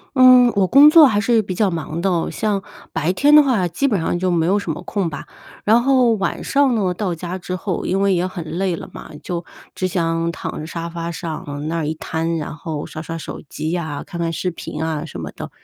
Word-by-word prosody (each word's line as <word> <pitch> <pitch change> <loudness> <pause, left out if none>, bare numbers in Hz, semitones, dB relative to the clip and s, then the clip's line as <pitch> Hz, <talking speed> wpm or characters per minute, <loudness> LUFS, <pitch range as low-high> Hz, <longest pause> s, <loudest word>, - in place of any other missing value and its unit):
嗯， 255 -1 +7
我 195 - +4
工 275 +9 +8
作 315 -2 +8
还 205 -4 +2
是 225 +1 +2
比 185 - -5
较 200 0 +2
忙 165 0 -4
的， 175 -2 0
像 205 -3 -1 0.3
白 160 +3 0
天 290 +9 +4
的 300 - +9
话 220 -10 +1
基 225 +12 0
本 205 -9 +1
上 175 +2 -1
就 185 0 0
没 165 -1 +1
有 200 +3 +3
什 180 - -4
么 165 +4 -7
空 185 -2 -2
吧， 145 - -7 0.4
然 225 +3 +4
后 255 -3 +4
晚 195 -2 -2
上 275 -3 +2
呢， 190 -5 0
到 180 -2 -2
家 175 +2 -5
之 185 0 -5
后， 185 -1 -3
因 195 - 0
为 195 -1 +3
也 175 +1 0
很 185 -2 -6 0.2
累 190 -3 0
了 - - -7
嘛， - - -10
就 175 -1 -4 0.3
只 185 - -1
想 165 -2 -1
躺 - - -6
着 155 - -6
沙 165 +1 -5
发 170 0 -5
上 150 -3 -5
那 165 - -2
儿 155 - -2
一 155 - -2
瘫， 165 +1 -2
然 150 0 -5
后 155 -1 -5
刷 155 - -7
刷 165 +1 -6
手 - - -7
机 155 - -4
呀、 155 -5 -3
看 170 - -8
看 165 -1 -1
视 180 +2 -2
频 160 -2 -7
啊 160 -2 -2
什 135 - -8
么 75 - -5
的。 - - -8
180 Hz, 260 characters per minute, -20 LUFS, 165-205 Hz, 0.4 s, 的